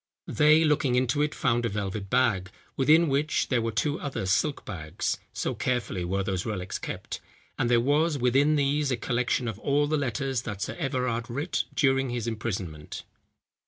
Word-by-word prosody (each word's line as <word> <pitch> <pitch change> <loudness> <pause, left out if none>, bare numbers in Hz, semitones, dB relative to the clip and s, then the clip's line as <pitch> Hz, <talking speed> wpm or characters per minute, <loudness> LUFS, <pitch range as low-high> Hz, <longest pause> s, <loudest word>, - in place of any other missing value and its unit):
They, 155 +2 +4
looking 145 -5 +2
into 125 +3 +2
it, 150 0 0
found 120 -2 +1
a 115 - 0
velvet 100 -1 -4
bag, 95 -7 +2 0.3
within 155 +5 +5
which, 145 +3 0
there 125 -3 +2
were 115 0 -1
two 145 +7 0
other 140 -9 -3
silk 125 +10 0
bags, 80 -7 -3
(so - - -2
carefully 120 -7 -1
were 95 +3 -1
those 95 -2 -2
relics 95 -4 -4
kept) - - -6 0.4
and 120 - +1
there 120 -1 +5
was 145 +5 +2
within 135 +4 +3
these 145 0 +1
a 125 - 0
collection 120 +1 0
of 110 -2 -4
all 145 +3 +2
the 155 +1 0
letters 135 -2 -1
that 105 -5 -6
Sir - - -3
Everard 125 -5 -1
writ 140 +8 -1
during 135 -2 +2
his 120 -2 -3
imprisonment." 100 -9 -4
125 Hz, 175 wpm, -27 LUFS, 110-145 Hz, 0.4 s, within